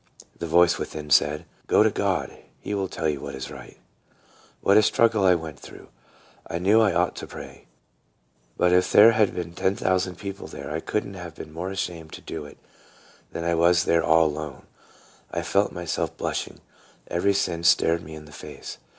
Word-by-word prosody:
The 85 - -3
voice 85 +1 +4
within 75 -1 -6
said, 75 +1 +3
" - - -35
Go - - +5
to - - +3
God; - - -1 0.2
he - - -5
will 100 -1 -1
tell 80 -3 -3
you 75 -3 -1
what - - -6
is 65 - -7
right." 65 -2 -11 0.8
What 100 - +4
a 110 - +8
struggle 110 -1 +3
I 90 -1 +6
went 80 -4 -6
through! - - -13 0.6
I 85 - -3
knew 100 +6 +4
I 110 -3 +4
ought 85 +1 +1
to - - -6
pray; - - -11 0.9
but 90 - +3
if 90 0 +3
there 110 +3 +8
had 110 -3 +2
been 85 -1 -5
ten 95 +2 0
thousand 95 -1 0
people 100 0 -7
there - - -8
I 80 - -2
could 105 +5 -2
n't 100 -1 -9
have 85 -3 -8
been 75 - -10
more 85 +3 -4
ashamed 85 -4 -5
to - - -9
do - - -6
it 75 - -13 0.7
than 85 - -5
I 85 0 +1
was 85 +1 +4
there 85 -1 +2
all 80 0 +5
alone, 75 -3 -4 0.6
I 85 - -3
felt 100 +4 +1
myself 85 -1 -3
blushing. - - -4 0.5
Every 100 +3 +1
sin 85 -4 -1
stared 85 -1 +4
me 80 0 -10
in 75 0 -11
the 75 - -15
face. - - -9
85 Hz, 200 wpm, -25 LUFS, 80-95 Hz, 0.9 s, a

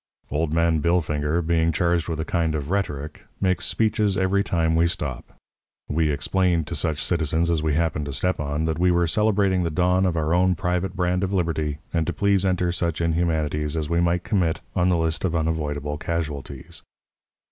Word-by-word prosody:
"Old 75 +1 0
Man 85 0 +2
Billfinger, 80 -1 +1
being 85 0 +2
charged 85 +1 +1
with 80 -2 -3
a 80 - -2
kind 80 -3 0
of 75 +2 -4
rhetoric, 75 -7 -3 0.2
makes 95 -3 +1
speeches 105 -3 +1
every 95 +1 +2
time 80 -3 +1
we 85 +1 +4
stop. 75 -6 -4 0.5
We 80 +1 +1
explained 85 +2 +1
to - - -4
such 75 0 -1
citizens 85 0 +1
as 80 -2 +1
we 80 -2 0
happened 80 -2 0
to 70 - -4
step 90 +5 0
on 75 +1 -2
that 80 0 -1
we 90 +1 +3
were 85 0 +3
celebrating 100 0 +2
the 85 - 0
dawn 90 +3 +2
of 85 -2 -1
our 80 +1 0
own 90 +1 +3
private 90 +2 -2
brand 90 0 0
of 95 +1 -1
liberty, 80 -4 -1 0.2
and 80 -2 0
to 85 - -1
please 100 0 +2
enter 90 -2 +1
such 85 -2 -2
inhumanities 80 -2 0
as 80 0 -3
we 85 0 +2
might 85 +1 +1
commit 90 -6 0
on 90 0 +2
the 90 - +3
list 80 0 -1
of 90 -3 0
unavoidable 75 -2 -2
casualties. 75 -5 -4
85 Hz, 190 wpm, -24 LUFS, 80-90 Hz, 0.5 s, we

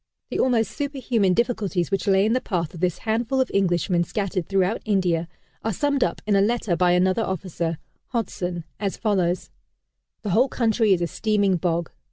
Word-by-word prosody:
The - - -2
almost 235 -4 +2
superhuman 250 -9 0
difficulties 205 -6 0
which 195 -1 -1
lay 195 0 +4
in 220 - +2
the 255 - +1
path 170 -4 -2
of 170 - -9
this 180 -1 0
handful 230 +4 -1
of 260 - +1
Englishmen 175 -2 +2
scattered 190 -1 -2
throughout 195 +2 +1
India, 180 -5 +1 0.4
are 225 - 0
summed 280 +6 +1
up - - -2
in 210 -1 +2
a 195 - +4
letter 220 -3 +1
by 175 +1 +3
another 185 +4 +2
officer, 175 -4 -2 0.3
Hodson, 180 -7 -3 0.2
as 200 -2 -2
follows: 185 -5 0 0.7
"The 205 - -2
whole 245 +8 +4
country 225 -3 +2
is 175 -2 0
a - - 0
steaming 200 0 +1
bog. 170 -1 -1
195 Hz, 180 wpm, -24 LUFS, 175-225 Hz, 0.7 s, lay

